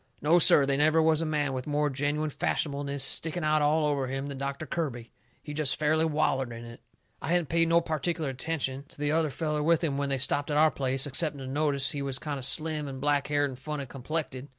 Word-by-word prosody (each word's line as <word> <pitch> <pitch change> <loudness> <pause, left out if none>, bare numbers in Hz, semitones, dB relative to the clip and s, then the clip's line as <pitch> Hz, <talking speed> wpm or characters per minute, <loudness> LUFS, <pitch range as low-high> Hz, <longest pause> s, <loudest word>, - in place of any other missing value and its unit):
No, 165 +4 +4
sir; 145 -3 +7
they 135 0 0
never 155 +2 +3
was 160 0 +3
a 165 - -1
man 145 -3 -1
with 130 +1 -5
more 150 0 +1
genuine 145 +3 -1
fashionableness 140 -1 -1
sticking 165 +4 0
out 155 0 +2
all 150 +1 +2
over 140 -3 0
him 135 +2 -4
than 140 -1 -6
Doctor 140 +2 -4
Kirby. 125 -9 -4 0.3
He 150 - -7
jest 150 -2 0
fairly 155 +1 +2
wallered 150 -5 0
in 115 0 -8
it. 115 0 -12 0.4
I - - -5
hadn't 175 -1 +1
paid 165 0 +2
no 170 +1 +4
pertic'ler 160 -1 -2
attention 135 0 -3
to - - -8
the 145 0 0
other 160 -1 +2
feller 150 +1 -2
with 165 +2 +2
him 140 -4 -1
when 140 0 -1
they 135 - 0
stopped 140 +3 +1
at 145 - 0
our 155 0 +5
place, 135 0 0
excepting 145 +2 -1
to 135 - -7
notice 140 0 0
he 145 - -4
was 135 -1 -2
kind 145 -1 -4
of 130 - -2
slim 155 0 +1
and 135 -1 -7
blackhaired 145 +1 +1
and 130 - -10
funny 150 0 -5
complected. 135 0 -5
145 Hz, 230 wpm, -28 LUFS, 135-155 Hz, 0.4 s, sir